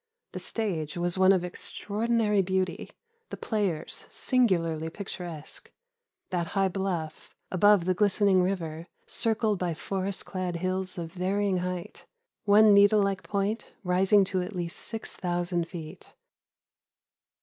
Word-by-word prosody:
The - - -6
stage 175 -9 -3
was 175 0 0
one 190 0 +7
of 185 -2 +2
extraordinary 210 +3 0
beauty, 185 -1 -1 0.4
the - - -6
players 190 -7 -2
singularly 165 - +1
picturesque. 175 -4 -8 0.6
That 175 -2 -1
high 195 -1 +3
bluff, 175 -5 -3 0.2
above 200 -1 +5
the 185 - +2
glistening 200 -1 +3
river, 170 -3 -2 0.2
circled 220 -3 +1
by 175 -3 -1
forest 195 +3 -3
clad 185 -2 -3
hills 185 +1 -2
of 165 -1 -5
varying 190 +1 0
height, 180 -1 -5 0.4
one 210 +1 +7
needle 200 +1 +6
like 195 -1 -1
point 205 +2 -2
rising 190 +3 +4
to 185 -1 -1
at 185 +3 -6
least 170 -1 -4
6000 175 -5 -3
feet. 165 -3 -9
185 Hz, 125 wpm, -28 LUFS, 175-200 Hz, 0.6 s, one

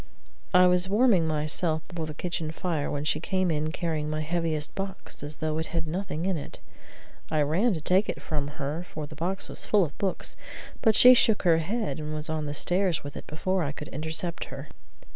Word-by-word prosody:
I 180 -1 +7
was 180 +1 +3
warming 205 -6 +4
myself 155 +1 0
before 165 -3 -5
the 155 - -7
kitchen 165 -2 -3
fire 160 -2 -2
when 145 0 -3
she 150 - +1
came 185 +1 0
in 155 0 -1
carrying 160 -3 -2
my 155 0 -1
heaviest 160 -1 -1
box 195 -1 -5
as 145 +1 -5
though 155 -1 -1
it 160 - -2
had 165 -1 -2
nothing 170 0 -3
in 190 -3 +1
it. 145 - -7 0.7
I 155 -1 +2
ran 185 +9 +2
to 160 - -5
take 185 +6 +3
it - - -3
from 145 -3 -2
her, 150 +3 -3
for 155 -4 -6
the 145 - -11
box 180 +5 -3
was - - -2
full 205 -2 +4
of 150 -4 -4
books, 195 -2 -1 0.5
but 220 -3 +4
she 250 +3 +10
shook 220 -3 +4
her 165 -3 +5
head, 205 +2 -2
and 155 0 -4
was 155 +1 -1
on 155 -1 -2
the 145 - -3
stairs 180 0 +2
with 145 0 -7
it - - -8
before 185 +5 -1
I 145 -3 -1
could 150 0 -8
intercept 160 +4 -3
her. 135 +2 -9
160 Hz, 215 wpm, -27 LUFS, 155-185 Hz, 0.7 s, she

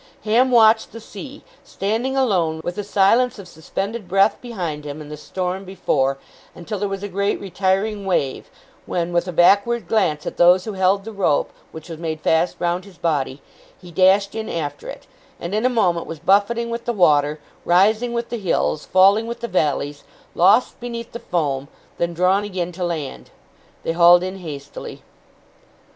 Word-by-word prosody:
Ham 235 +4 +3
watched 225 -2 +4
the 230 - -8
sea, 260 +6 -10 0.2
standing 230 +7 -2
alone, 180 -11 +1
with 175 - -3
the 205 - -4
silence 210 +5 +2
of 200 -3 -10
suspended 195 +6 -5
breath 195 +3 +3
behind 175 -11 -5
him, 145 +1 -7
and 150 -1 -10
the - - -5
storm 185 +5 -4
before, 140 -8 0 0.4
until 190 +4 -6
there 205 0 -1
was 195 0 -5
a - - -2
great 200 +1 -1
retiring 195 +2 -1
wave, 160 -8 -1 0.4
when, 175 0 -2
with 175 +1 +1
a - - -3
backward 200 +5 +3
glance 170 -8 +1
at - - -5
those 180 +1 +5
who 215 - -4
held 190 +1 +2
the 225 - -7
rope 195 -8 0 0.2
which 160 +1 -10
was 165 -2 -8
made 160 -2 -4
fast 160 +3 +1
round 175 +1 -1
his 195 -3 -16
body, 140 -4 -2 0.4
he 180 -1 -13
dashed 190 +3 +3
in 220 -1 -5
after 155 -4 -4
it, - - -9 0.3
and 170 +3 -5
in 215 +4 +2
a - - +1
moment 180 -9 +1
was 165 - -6
buffeting 205 +8 +1
with 235 0 -5
the 240 - -1
water; 150 -6 +3 0.2
rising 215 +7 +3
with 235 0 -3
the 235 - -4
hills, 165 -5 -1
falling 200 +4 +4
with 235 - -5
the 235 - -4
valleys, 145 -6 -1 0.3
lost 215 +8 +3
beneath 235 -1 -6
the 235 - -7
foam; 140 - -2 0.3
then 170 0 0
drawn 185 +4 +2
again 185 -4 -3
to 180 +1 -5
land. 150 - -4 0.5
They - - -1
hauled 175 +1 +6
in 185 +1 -5
hastily. 145 -5 -8
185 Hz, 180 wpm, -21 LUFS, 170-215 Hz, 0.5 s, hauled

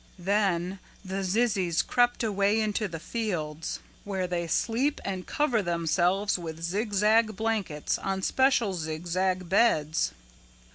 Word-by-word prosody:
"Then 190 -1 0 0.3
the 190 +1 -3
zizzies 190 -4 +1
crept 245 0 +2
away 205 0 +2
into 215 0 0
the 165 -3 -6
fields 165 -8 -3 0.2
where 190 -2 -2
they 175 -1 -2
sleep 245 - 0
and 190 -2 -4
cover 260 -7 +1
themselves 175 +3 +1
with 165 -1 -7
zigzag 210 +3 +2
blankets 210 -8 -1
on 195 -1 -2
special 260 -6 +2
zigzag 175 +3 -2
beds. 165 -7 +2
195 Hz, 115 wpm, -28 LUFS, 175-215 Hz, 0.3 s, crept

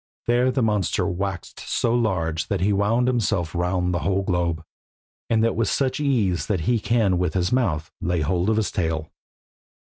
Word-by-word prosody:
There 120 +2 +3
the 130 -1 0
monster 105 -5 +1
waxed 95 0 -4
so 115 - 0
large 90 -9 0
that 100 -3 -1
he 100 +2 +2
wound 110 +5 +2
himself 100 -9 0
round 90 +1 0
the 90 - 0
whole 95 +3 0
globe, 85 -3 -1 0.7
and 110 -1 +3
that 115 - +1
with 115 0 +1
such 130 -1 0
ease 115 - +1
that 100 -6 0
he 120 +7 +1
can 105 -4 +1
with 90 -2 -1
his 90 -1 +1
mouth 90 - 0
lay 90 -2 0
hold 90 +6 0
of 110 - +2
his 110 - 0
tail. 80 -3 -2
95 Hz, 180 wpm, -23 LUFS, 90-115 Hz, 0.7 s, There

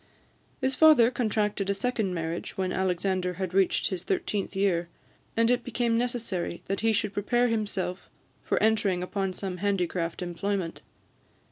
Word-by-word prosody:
His 265 0 +1
father 265 -5 +6
contracted 210 -4 0
a 200 - +1
second 210 -3 -1
marriage 165 0 -4
when 185 -1 -1
Alexander 185 0 0
had 185 0 -3
reached 190 -1 +2
his 185 -2 -3
thirteenth 195 +1 -2
year; 180 -3 +1 0.5
and 230 +1 +4
it 245 - +1
became 240 -1 0
necessary 230 -8 -2
that 195 0 -2
he 225 +1 +2
should 210 -1 0
prepare 240 +5 +2
himself 200 -5 -2 0.3
for - - 0
entering 210 -5 +2
upon 195 +1 -2
some 185 0 -5
handicraft 180 -3 -1
employment. 180 0 -3
195 Hz, 145 wpm, -28 LUFS, 180-225 Hz, 0.5 s, father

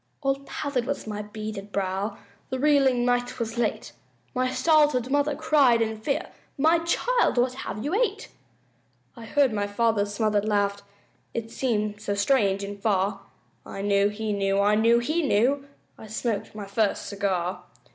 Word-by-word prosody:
All 275 0 +1
pallid 260 -4 -2
was 280 - -3
my 210 -1 -4
beaded 210 -1 -7
brow, 195 +2 -2 0.3
The 260 - -2
reeling 270 -3 +3
night 245 0 0
was 230 0 -3
late, 225 -3 -1 0.4
My 255 -1 0
startled 295 -4 +3
mother 285 +1 +2
cried 285 -6 +4
in 220 -1 0
fear, 275 +5 -2 0.3
"My 320 +4 +4
child, 475 - +1
what 250 +1 +2
have 215 -4 -6
you 300 - -2
ate?" 430 -1 0 0.9
I 230 -2 -10
heard 270 0 +2
my 205 -1 -1
father's 205 -1 +1
smothered 210 -1 +1
laugh, 200 -1 +1 0.5
It 225 -1 -4
seemed 210 -5 -1
so 205 -1 -2
strange 200 -3 +2
and 200 0 -7
far, 195 -1 0 0.4
I 195 - -7
knew 200 0 +3
he 210 0 -3
knew 195 0 +1
I 205 +1 +3
knew 230 +2 +4
he 310 +8 0
knew 275 +1 +1 0.3
I'd 220 - -11
smoked 220 -1 -3
my 210 -2 -6
first 200 +1 0
cigar! 190 -3 -2
225 Hz, 160 wpm, -26 LUFS, 205-270 Hz, 0.9 s, cried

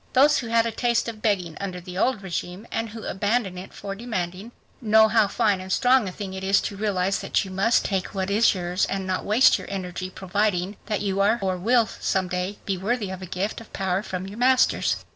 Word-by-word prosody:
Those 285 +3 +5
who 240 - -5
had 230 0 +3
a 230 - -1
taste 235 +1 0
of 220 -2 -6
begging 185 -7 0
under 185 -2 -4
the 180 0 -9
old 215 +1 +1
regime 180 +2 -5
and 225 0 -2
who 220 +1 -9
abandoned 200 -1 -1
it 185 - -10
for 195 - -6
demanding, 195 -1 -4 0.3
know 220 -1 +5
how 220 -2 +4
fine 205 -2 +1
and 190 0 -7
strong 250 -2 +3
a - - -7
thing 195 0 -6
it 190 0 -6
is 195 +1 +4
to 205 - -4
realize 195 -2 0
that - - 0
you 190 - -8
must 200 +5 +2
take 195 0 -2
what 190 0 -1
is 215 +1 +4
yours 180 +1 -1
and 195 -1 -3
not 185 0 -2
waste 220 +6 +5
your - - -9
energy 185 -1 -4
proving 190 0 -1
that 210 -2 -1
you 195 -1 -1
are 205 +4 +3
or 190 -2 -1
will 230 +6 +3
some 190 -3 -1
day 180 +3 -3
be 195 -2 -2
worthy 210 0 -1
of 190 0 -7
a 185 - -7
gift 190 +5 -3
of 225 - -15
power 190 -1 0
from 185 -3 -5
your 200 +4 -9
masters. 255 +1 +3
200 Hz, 230 wpm, -24 LUFS, 185-220 Hz, 0.3 s, Those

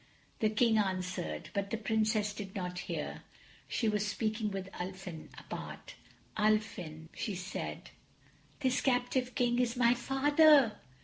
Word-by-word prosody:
The 215 - +3
King 220 0 +3
answered, 185 - -2
but 200 0 -1
the 225 - -1
Princess 215 -1 +1
did 200 -2 -7
not 180 -2 -3
hear. - - -3 0.5
She 230 - 0
was 210 -1 +1
speaking 215 +1 -1
with 195 -1 -4
Ulfin, 180 -2 -6
apart. - - -7 0.4
"Ulfin," 200 -7 0
she 210 - -3
said, 180 +2 -5 0.7
"this 260 -1 +2
captive 250 0 +1
King 245 -1 +2
is 245 0 +1
my 235 -1 +5
Father." 275 -1 +5
215 Hz, 130 wpm, -33 LUFS, 190-245 Hz, 0.7 s, my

